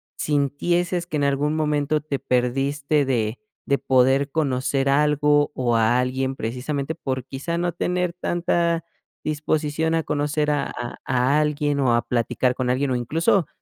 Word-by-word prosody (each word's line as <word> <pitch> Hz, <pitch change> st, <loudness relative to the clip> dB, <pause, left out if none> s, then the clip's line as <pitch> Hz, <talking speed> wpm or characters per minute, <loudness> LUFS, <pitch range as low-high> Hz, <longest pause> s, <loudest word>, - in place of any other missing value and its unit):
sintieses 170 Hz, +5 st, 0 dB
que 155 Hz, -, -2 dB
en 145 Hz, -, +1 dB
algún 145 Hz, +2 st, +1 dB
momento 150 Hz, -1 st, +1 dB
te 145 Hz, -2 st, -4 dB
perdiste 140 Hz, +4 st, 0 dB
de 115 Hz, -4 st, -1 dB, 0.3 s
de 140 Hz, -, +2 dB
poder 135 Hz, +2 st, +3 dB
conocer 135 Hz, -2 st, 0 dB
algo, 150 Hz, +1 st, +3 dB
o 120 Hz, -2 st, +1 dB
a 115 Hz, +2 st, +3 dB
alguien 130 Hz, +1 st, -1 dB
precisamente 135 Hz, +6 st, -3 dB
por, 130 Hz, -5 st, -4 dB
quizá, 140 Hz, +6 st, -4 dB
no 175 Hz, 0 st, 0 dB
tener 180 Hz, 0 st, -1 dB
tanta 170 Hz, -1 st, 0 dB, 0.4 s
disposición 155 Hz, +1 st, 0 dB
a 165 Hz, -, 0 dB
conocer 150 Hz, +1 st, 0 dB
a 145 Hz, -2 st, 0 dB
a 120 Hz, 0 st, -6 dB
a 130 Hz, +3 st, +2 dB
alguien, 150 Hz, -1 st, 0 dB
o 125 Hz, -3 st, +3 dB
a 120 Hz, -, +2 dB
platicar 125 Hz, +1 st, 0 dB
con 125 Hz, -1 st, -1 dB
alguien, 130 Hz, +2 st, +1 dB
o, -, -, +1 dB
incluso, 160 Hz, -, +1 dB
145 Hz, 155 wpm, -23 LUFS, 130-155 Hz, 0.4 s, poder